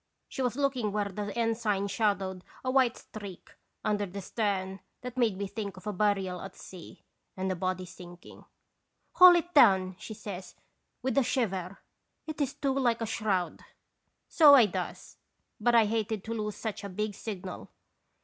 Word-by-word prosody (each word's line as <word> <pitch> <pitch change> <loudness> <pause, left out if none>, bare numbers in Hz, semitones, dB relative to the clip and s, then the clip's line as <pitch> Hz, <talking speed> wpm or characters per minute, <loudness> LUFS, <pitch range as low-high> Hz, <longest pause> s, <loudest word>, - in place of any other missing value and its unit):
She 270 - -5
was 250 -2 0
looking 260 -6 0
where 205 0 -1
the 205 +1 -4
ensign 225 -4 0
shadowed 195 -3 -1 0.2
a 255 - +1
white 255 -2 +3
streak 200 -4 -10 0.3
under 205 -1 0
the 195 +2 -7
stern 195 -2 -2 0.2
that 250 0 -7
made 230 -6 +1
me 200 - -2
think 200 -1 -5
of 185 - -13
a 210 - -2
burial 195 -2 0
at 195 -1 -9
sea 180 -3 -12 0.3
and 190 0 -1
the - - -1
body 185 +1 -2
sinking. 175 -1 -13 0.4
" - - -48
'Haul 360 -1 +10
it 350 +1 -1
down! 190 -9 +5
' - - -30
she 220 - -8
says, 200 -3 -8 0.5
with 260 +2 +2
a - - +3
shiver. 195 -7 -1 0.3
' - - -50
It 310 -1 -5
is 275 -1 -1
too 275 -2 0
like 240 -4 +1
a - - 0
shroud! 210 -5 -1 0.2
' - - -51
" - - -51
So 295 -3 +8
I 250 -5 +7
does, 205 - -5 0.4
but 235 +2 +3
I 230 -2 +6
hated 220 -1 -1
to 225 - -4
lose 210 -2 -3
such 220 -3 -5
a 200 - -5
big 210 +3 -3
signal. 190 -3 -7
210 Hz, 190 wpm, -29 LUFS, 190-235 Hz, 0.5 s, Haul